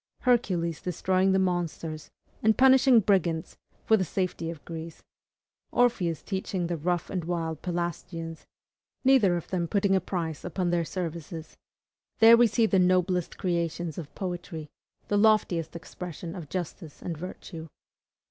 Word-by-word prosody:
Hercules 185 - +1
destroying 185 +2 +1
the 190 - +3
monsters 170 -4 -2 0.3
and 220 0 +3
punishing 260 -2 +6
brigands 175 -5 0 0.3
for 220 - +5
the 190 - +1
safety 180 -2 -2
of 165 -3 -8
Greece, 165 -1 -8 0.7
Orpheus 195 -10 +1
teaching 190 -2 -2
the 170 0 -2
rough 175 +2 -1
and 180 -3 -2
wild 165 -2 -3
Pelasgians, 170 -2 -4 0.6
neither 245 -10 +5
of 170 - -7
them 175 -2 -1
putting 200 +1 +2
a 190 - +2
price 165 -5 -3
upon 180 0 -1
their 170 -1 +1
services, 165 -2 -5 0.6
there 225 +1 +9
we 235 0 +6
see 225 +1 +2
the 195 -3 +3
noblest 180 -1 +2
creations 170 -2 -2
of 155 -4 -9
poetry, 175 -4 -5 0.4
the 205 - +1
loftiest 200 -7 +2
expression 170 0 -7
of 170 -6 -8
justice 175 -3 -6
and 170 - -3
virtue. 165 0 -8
175 Hz, 140 wpm, -27 LUFS, 165-190 Hz, 0.7 s, there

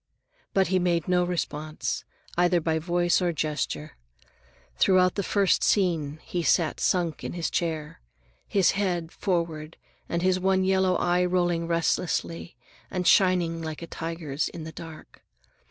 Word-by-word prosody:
But 190 -2 +3
he 185 0 +2
made 175 -2 0
no 180 -1 +3
response, 155 -3 -3 0.3
either 175 0 +3
by 160 0 0
voice 175 +2 +1
or 175 -1 +1
gesture. 155 -1 -3 0.8
Throughout 185 -1 +4
the 200 - -1
first 200 0 +2
scene 165 -7 +1
he 175 - -3
sat 165 -1 +2
sunk 175 -4 0
in - - -4
his 170 -1 -2
chair, 155 - -3 0.5
his 195 -3 +3
head 180 -4 -1
forward 165 -4 -2 0.3
and 170 +1 -1
his 185 0 +2
one 190 0 +2
yellow 190 -1 +2
eye 175 +1 +2
rolling 175 -2 +1
restlessly 170 -3 -1 0.3
and 180 -1 -3
shining 175 -3 +3
like 160 0 -5
a - - -4
tiger's 165 -3 -3
in 165 - -8
the 160 - -7
dark. 160 -1 -11
175 Hz, 145 wpm, -26 LUFS, 160-180 Hz, 0.8 s, Throughout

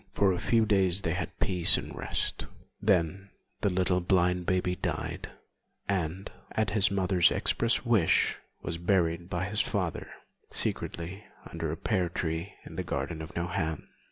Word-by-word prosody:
For 95 -2 +3
a 90 - -2
few 115 -2 +3
days 95 -3 +3
they 85 -4 0
had - - -4
peace 90 -3 +3
and - - -6
rest; - - -2 0.3
then 95 0 +1 0.3
the 100 - +2
little 90 0 +2
blind 90 0 +2
baby 90 -1 +1
died, - - -3 0.6
and, 95 -1 -2 0.2
at 110 -2 +1
his 105 -1 +5
mother's 95 -2 +3
express 115 +2 +3
wish, 110 -8 +3 0.2
was 85 -1 -3
buried 85 -1 +1
by 90 0 -1
his 105 +2 0
father 95 -6 -2 0.4
secretly 90 +4 -3 0.3
under - - -3
a - - -4
pear 90 -2 0
tree 85 +3 -3
in - - -10
the - - -1
garden 80 -2 -3
of 80 - -9
Nohant. 85 -2 -2
90 Hz, 155 wpm, -29 LUFS, 85-100 Hz, 0.6 s, his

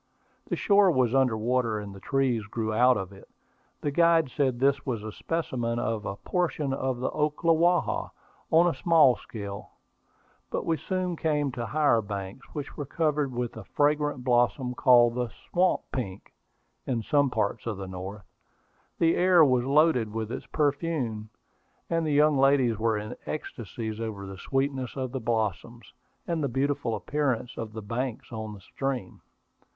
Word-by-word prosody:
The - - -1
shore 200 -1 +4
was 130 -7 +2
under 130 -4 +3
water, 115 0 0
and 105 -1 -6
the 95 - -11
trees 130 -3 0
grew 110 0 -2
out 125 +3 +5
of 95 -1 -5
it. 95 - -15 0.5
The 145 - -1
guide 165 -2 +3
said 130 -4 0
this 140 +2 +2
was 120 -6 -3
a 110 - -5
specimen 120 -6 -2
of 115 -3 -2
a 100 - -3
portion 150 - -1
of 130 -2 -1
the 125 - -1
Ocklawaha, 165 +3 +1 0.4
on 165 +2 +5
a 175 - +2
small 155 -3 +5
scale. 100 -3 -8 0.8
But - - -3
we 165 -1 +1
soon 180 +3 -2
came 150 -3 0
to 120 -2 -4
higher 150 -7 +3
banks, 100 +2 -6
which 145 -2 -6
were 145 - -4
covered 150 -3 0
with 120 -1 -3
a 110 - -8
fragrant 145 0 0
blossom 125 +1 +2
called 120 -2 +5
the 125 -1 -2 0.2
"swamp 180 +1 +3
pink" 100 -8 -5 0.5
in 120 -4 -1
some 145 +3 +2
parts 110 -1 -2
of 110 -4 -2
the 95 -1 -6
North. 95 +2 -7 0.7
The 165 0 +3
air 180 -3 +6
was 125 -3 +2
loaded 140 -6 +3
with 110 0 -4
its - - -6
perfume, 140 -8 -1 0.6
and 165 -1 +1
the - - 0
young 150 -1 +4
ladies 135 -4 +4
were 110 -1 +1
in 105 +1 -5
ecstasies 115 -6 -5
over 110 -3 -5
the 95 -1 -9
sweetness 135 0 -2
of 130 -2 -3
the 130 - -3
blossoms, 115 +1 -2 0.3
and 165 -3 -1
the 140 - 0
beautiful 135 -2 0
appearance 130 -5 -1
of 110 -1 -6
the 110 -1 -6
banks 120 +3 -4
of 110 -2 -5
the 100 - -13
stream. 130 -2 -4
130 Hz, 165 wpm, -27 LUFS, 110-150 Hz, 0.8 s, air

